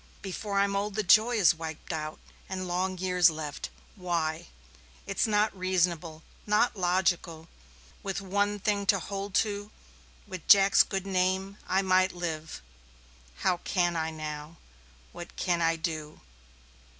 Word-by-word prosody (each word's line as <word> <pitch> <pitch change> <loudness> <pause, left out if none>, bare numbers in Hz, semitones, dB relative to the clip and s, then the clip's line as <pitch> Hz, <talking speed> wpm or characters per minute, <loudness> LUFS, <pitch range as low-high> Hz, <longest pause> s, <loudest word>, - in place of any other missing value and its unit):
Before 200 +1 -4
I'm 200 0 +2
old 200 0 -2
the 215 - 0
joy 220 +6 +5
is 200 -7 +5
wiped 160 0 -6
out 155 -1 -4 0.3
and 185 -1 -4
long 185 +1 -1
years 180 -1 +4
left. 155 -2 -5 0.3
Why? 170 -4 -2 0.6
It's - - 0
not 210 0 +2
reasonable 175 -3 -1 0.2
not 210 +3 +3
logical. 175 -3 0 0.5
With 195 -1 -3
one 205 +1 0
thing 200 -1 -1
to 200 - +5
hold 200 +1 -5
to, 205 0 -5 0.6
with 185 -5 -8
Jack's 200 -1 +7
good 195 -1 -1
name, 190 +1 0
I 190 +1 +2
might 185 0 +3
live. 160 - -5 0.8
How 180 -1 +3
can 175 -1 0
I, 160 -1 -1
now? 155 0 -6 0.6
What 175 - -9
can 175 -2 0
I 165 0 +3
do? 160 -2 -5
185 Hz, 140 wpm, -29 LUFS, 165-200 Hz, 0.8 s, Jack's